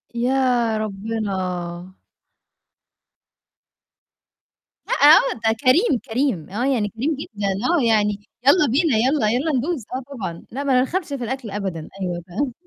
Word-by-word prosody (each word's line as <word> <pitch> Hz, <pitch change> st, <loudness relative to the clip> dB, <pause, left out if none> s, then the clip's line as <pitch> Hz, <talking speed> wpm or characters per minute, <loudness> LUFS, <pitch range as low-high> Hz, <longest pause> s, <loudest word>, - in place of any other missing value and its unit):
يا 245 Hz, -2 st, +1 dB
ربنا! 190 Hz, -4 st, -4 dB, 2.9 s
لأ -, -, -1 dB
آه 295 Hz, -1 st, +6 dB, 0.2 s
ده -, -, +3 dB
كريم، 265 Hz, -, +4 dB
كريم. 230 Hz, -, -1 dB
آه 225 Hz, +6 st, -2 dB
يعني 240 Hz, -7 st, +1 dB
كريم 275 Hz, +9 st, -2 dB
جدًا، 205 Hz, -7 st, -4 dB, 0.2 s
آه 340 Hz, -7 st, +2 dB
يعني 210 Hz, -2 st, +2 dB, 0.3 s
يالّا 300 Hz, +1 st, +6 dB
بينا، 285 Hz, -4 st, +2 dB
يالّا 250 Hz, -1 st, +2 dB
يالّا 270 Hz, +7 st, 0 dB
ندوس، 280 Hz, -3 st, -2 dB
آه 260 Hz, -, -4 dB
طبعًا، 170 Hz, -5 st, -5 dB
لأ 275 Hz, +4 st, -4 dB
ما 275 Hz, -2 st, +1 dB
نرخمش 340 Hz, +8 st, -1 dB
في 280 Hz, -4 st, -4 dB
الأكل 245 Hz, -3 st, -4 dB
أبدًا. 190 Hz, -6 st, -4 dB
أيوه، 175 Hz, -2 st, -3 dB
فاهمة. 240 Hz, +8 st, -2 dB
235 Hz, 135 wpm, -21 LUFS, 200-270 Hz, 2.9 s, آه